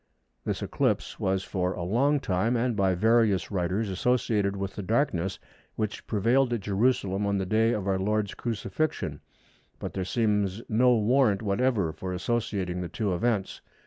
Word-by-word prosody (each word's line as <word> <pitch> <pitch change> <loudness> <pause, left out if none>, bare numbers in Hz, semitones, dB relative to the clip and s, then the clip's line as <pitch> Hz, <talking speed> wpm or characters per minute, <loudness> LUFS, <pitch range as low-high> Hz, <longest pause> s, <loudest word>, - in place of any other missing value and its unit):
This - - -2
eclipse - - -1
was 95 0 0
for 90 -2 -1
a 85 - -5
long 135 +11 +2
time, 110 +1 0
and 120 0 0
by 95 -2 +2
various 110 -1 +2
writers, 95 +3 0
associated 100 0 +1
with 100 -1 -4
the - - -4
darkness 95 - 0 0.4
which 110 -1 -3
prevailed 120 +5 +2
at 115 - -1
Jerusalem 100 -1 +1
on 100 0 +1
the 95 - -1
day 110 +4 +2
of 100 -4 -3
our 95 -1 +1
Lord's 105 +1 0
Crucifixion, 120 +7 -3 0.6
but - - -6
there 95 - -2
seems 105 0 0
no 125 +2 +4
warrant 110 -1 +3
whatever 105 -5 +1
for 95 +3 -5
associating 95 -3 -2
the 90 - -4
two 100 +1 -1
events. 105 +1 -1
105 Hz, 160 wpm, -27 LUFS, 95-115 Hz, 0.6 s, no